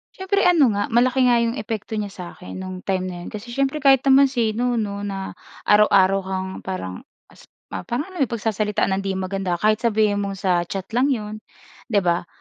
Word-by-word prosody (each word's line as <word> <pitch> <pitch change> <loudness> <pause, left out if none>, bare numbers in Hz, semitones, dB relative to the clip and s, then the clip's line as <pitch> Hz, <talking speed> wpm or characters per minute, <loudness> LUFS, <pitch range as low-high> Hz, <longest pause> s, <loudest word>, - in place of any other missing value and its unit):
Siyempre, 390 +1 0
ano 340 -6 +5
nga 205 +2 -2
malaki 250 +3 +3
nga 245 -1 +4
yung 230 0 0
epekto 220 0 -4
niya 205 -2 -3
sa 185 - -8
akin 180 - -9
no'ng 185 -1 -7
time 190 -1 -1
na 180 - -6
iyon, - - -7
kasi 215 +2 -8
siyempre 275 +4 -1
kahit 270 -2 +5
naman 275 0 +6
sino 240 -1 0
'no 205 -3 -2
na 195 -1 -5 0.3
araw-araw 195 -2 +5
kang 190 0 -4
parang 95 - -5 0.3
as - - -18 0.2
ma - - -6
parang 280 +10 -3
ano 365 - -9
eh, 275 - +3
pagsasalitaan 215 -3 -1
nang 190 - +1
hindi 195 -1 -2
maganda, 190 -1 -2
kahit 215 +4 +2
sabihin 215 -3 +2
mong 200 -1 -3
sa 180 -3 0
chat 195 +1 -4
lang 250 +4 +2
'yon, 215 -5 -2 0.5
'di 205 -5 +1
ba? 175 0 0
210 Hz, 205 wpm, -22 LUFS, 190-245 Hz, 0.5 s, naman